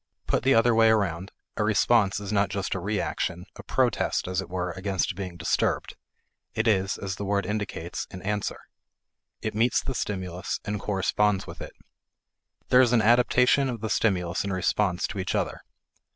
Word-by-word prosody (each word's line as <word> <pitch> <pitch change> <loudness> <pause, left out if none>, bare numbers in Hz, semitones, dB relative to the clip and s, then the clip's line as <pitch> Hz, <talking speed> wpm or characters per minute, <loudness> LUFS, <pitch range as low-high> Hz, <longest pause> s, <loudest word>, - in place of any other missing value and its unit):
Put - - +1
the 135 +2 +4
other 115 +1 +4
way 115 0 +5
around, 100 -4 0 0.3
a 105 - +1
response 105 -1 +3
is 100 0 -5
not 100 -1 +2
just 100 -1 -2
a 95 - -2
re 100 +3 -1
action, 90 0 -3
a - - -9
protest, - - 0
as 90 0 -1
it 95 - -9
were, 90 -1 -2
against 95 -1 -2
being 90 -2 -6
disturbed; 80 - 0 0.6
it 110 +2 0
is, 95 -3 +2
as 95 0 -4
the - - -4
word 100 0 0
indicates, 105 -5 -4
an 90 - -9
answer. 105 +1 -2 0.9
It 110 - -2
meets 115 +3 +2
the 135 - -4
stimulus, 95 -6 -3
and 105 -1 -2
corresponds 100 0 +1
with - - -10
it. - - -8 1.0
There 125 - +7
is 125 -2 +3
an 115 - +5
adaptation 125 +3 +4
of 120 -4 -5
the 110 -2 -3
stimulus 90 -6 +1
and 100 - -3
response 95 0 0
to 100 - -5
each 95 - -2
other. - - -2
100 Hz, 180 wpm, -26 LUFS, 95-110 Hz, 1.0 s, There